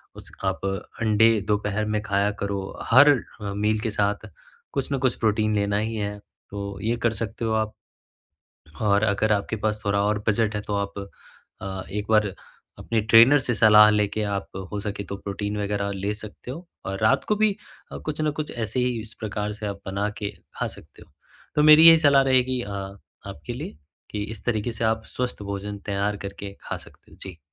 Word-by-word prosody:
उसक - - -14
आप 95 0 0 0.4
अंडे 110 0 +5 0.2
दोपहर 105 0 0
में 105 0 -1
खाया 100 0 +1
करो। 100 -1 -2 0.3
हर 140 +5 +8 0.3
मील 105 +2 0
के 115 - -1
साथ 105 +1 -1 0.5
कुछ 140 0 -2
न - - +1
कुछ 130 -2 +1
प्रोटीन 110 -1 +1
लेना 100 0 +1
ही 110 +1 -2
है 105 -1 -3 0.3
तो 100 -1 -6
ये 115 +2 +1
कर 115 - +2
सकते 115 +1 -4
हो 110 - 0
आप। 110 -1 0 1.1
और 100 0 +3
अगर 110 +1 +2
आपके 105 +2 -1
पास 105 0 -2
थोड़ा 100 0 +1
और 105 0 +1
बजट 110 0 +1
है - - -1
तो 105 - -4
आप 100 0 -3 0.6
अ, 95 -1 -4
एक 105 +1 -3
बार 105 -3 +3 0.5
अपने 115 -1 -1
ट्रेनर 115 +6 +7
से 120 - 0
सलाह 105 0 +7
लेके 105 0 0
आप 100 -1 -2 0.2
हो 105 - -2
सके 100 -1 -4
तो 100 - -6
प्रोटीन 100 +1 -4
वगैरह 100 0 -1
ले 100 +2 -2
सकते 110 +3 -10
हो 170 +7 -8 0.2
और 95 0 -3
रात 110 - +3
को 210 - +2
भी 215 -1 +2 0.5
कुछ 155 0 -3
ना 155 - +2
कुछ 150 - -4
ऐसे 115 +2 -2
ही 125 -2 0
इस 110 0 -11
प्रकार 105 -1 -3
से 105 0 -6
आप 100 -1 -5
बना 100 +2 -1
के 100 -2 -3 0.3
खा - - 0
सकते - - -16
हो। - - -31 0.4
तो 150 - +4
मेरी 155 +2 +10
यही 165 -1 +9
सलाह 140 -3 +5
रहेगी 130 -1 +2
अ, 100 - -7 0.6
आपके 70 0 -7
लिए 75 - -7 0.3
कि 105 -1 -3
इस 110 - -9
तरीके 115 0 0
से 115 0 -3
आप 110 0 +1
स्वस्थ 125 -4 -4
भोजन 100 +1 -5
तैयार 100 +1 -1
करके 100 0 -7
खा - - -4
सकते - - -17
हैं, - - -17
जी। 95 -4 -8
105 Hz, 195 wpm, -24 LUFS, 100-115 Hz, 1.1 s, मेरी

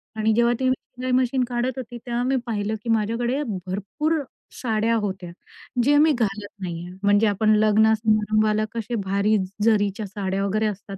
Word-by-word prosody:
आणि 220 0 +1
जेव्हा 235 +1 +3
ती 260 0 +2
शिलाई 255 0 -5
मशीन 255 0 +2
काढत 245 +1 -2
होती 240 -1 -6
तेव्हा 240 0 -1
मी 265 +1 +1
पाहिलं, 215 -1 -2
की 235 - -5
माझ्याकडे 230 +5 0
भरपूर 205 - -2 0.4
साड्या 225 -1 +1
होत्या. 190 -5 -3 0.5
ज्या 290 +2 +4
मी 310 +1 +5
घालत 205 -2 -1
नाही 175 -1 -5
आहे. 180 +1 -10
म्हणजे 205 +2 +4
आपण 215 +1 +3
लग्न 215 +1 +4
समारंभाला 215 0 +2
कसे 235 +1 -4
भारी 200 +1 +1 0.3
जरीच्या 210 -2 +2
साड्या 195 -1 -2
वगैरे 215 +2 0
असतात 200 -1 -6
215 Hz, 165 wpm, -23 LUFS, 205-240 Hz, 0.5 s, मी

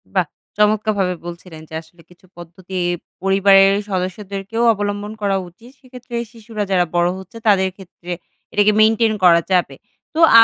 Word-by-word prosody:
বাহ! - - +3 0.3
চমৎকারভাবে 210 -3 +2
বলছিলেন 170 -2 -9
যে - - -14
আসলে 165 +1 -21
কিছু 180 +1 -21
পদ্ধতি 175 +2 -9 0.4
পরিবারের 195 0 +5
সদস্যদেরকেও 195 +3 -3
অবলম্বন 205 0 -3
করা 200 -1 +1
উচিত। 230 +8 -18
সেক্ষেত্রে 250 -2 -10 0.2
শিশুরা 225 -2 -5
যারা 180 -2 +3
বড় 175 0 +3
হচ্ছে 190 +4 -11
তাদের 190 -2 +4
ক্ষেত্রে 180 -2 -11 0.4
এটাকে 205 +1 +4
মেইনটেইন 220 +1 +4
করা 170 -2 +6
যাবে। 180 -1 +2 0.4
তো 320 - -3 0.2
আ - - +10
195 Hz, 145 wpm, -19 LUFS, 180-215 Hz, 0.4 s, আ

